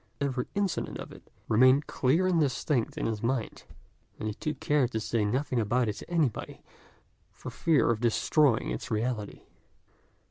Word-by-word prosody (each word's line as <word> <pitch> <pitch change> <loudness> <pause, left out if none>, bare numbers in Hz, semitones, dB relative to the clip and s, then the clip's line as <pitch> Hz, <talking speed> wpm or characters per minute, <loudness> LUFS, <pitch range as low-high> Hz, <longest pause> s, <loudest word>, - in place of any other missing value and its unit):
Every 130 -3 -1
incident 200 -3 -1
of - - -8
it, - - -12
however, - - -32
remained 130 +6 +5
clear 150 +8 +1
and 180 -3 +2
distinct 135 -3 0
in - - -2
his 110 -2 -2
mind, 120 -1 -2 0.5
and 110 - -4
he 105 - -2
took 155 +8 -4
care 145 -4 +2
to 110 -2 -3
say 110 0 -1
nothing 125 +4 0
about 120 +3 +1
it 105 - -1
to - - -10
anybody, 160 -9 -1 0.7
for - - -9
fear 155 -7 +2
of 110 - -1
destroying 120 +2 +2
its - - -5
reality. 110 -1 -2
125 Hz, 170 wpm, -28 LUFS, 110-150 Hz, 0.7 s, remained